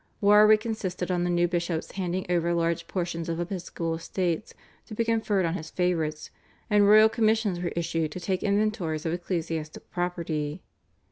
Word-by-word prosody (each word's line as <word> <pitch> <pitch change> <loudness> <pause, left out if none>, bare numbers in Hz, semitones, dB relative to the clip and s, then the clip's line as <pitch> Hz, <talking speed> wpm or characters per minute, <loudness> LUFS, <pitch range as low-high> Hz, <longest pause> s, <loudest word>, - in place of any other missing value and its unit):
Warwick 210 +1 +6
insisted 185 -5 -3
on 175 -1 +1
the - - 0
new 175 0 +2
bishops 170 -2 -2
handing 185 -1 -2
over 170 -1 +1
large 170 0 0
portions 170 -2 -3
of 165 0 -2
episcopal 175 -2 -3
estates 170 +3 -2 0.4
to 215 - -8
be 230 - 0
conferred 220 -4 +1
on 165 - 0
his 160 -4 -5
favourites, 165 -4 -1 0.4
and 205 -1 +5
royal 215 +1 +8
commissions 220 -4 +1
were 175 -1 -2
issued 165 -2 -1
to - - -5
take 185 +1 -2
inventories 200 -6 0
of 165 - 0
ecclesiastical 165 -3 -4
property. 170 -3 -3
175 Hz, 160 wpm, -27 LUFS, 165-200 Hz, 0.4 s, royal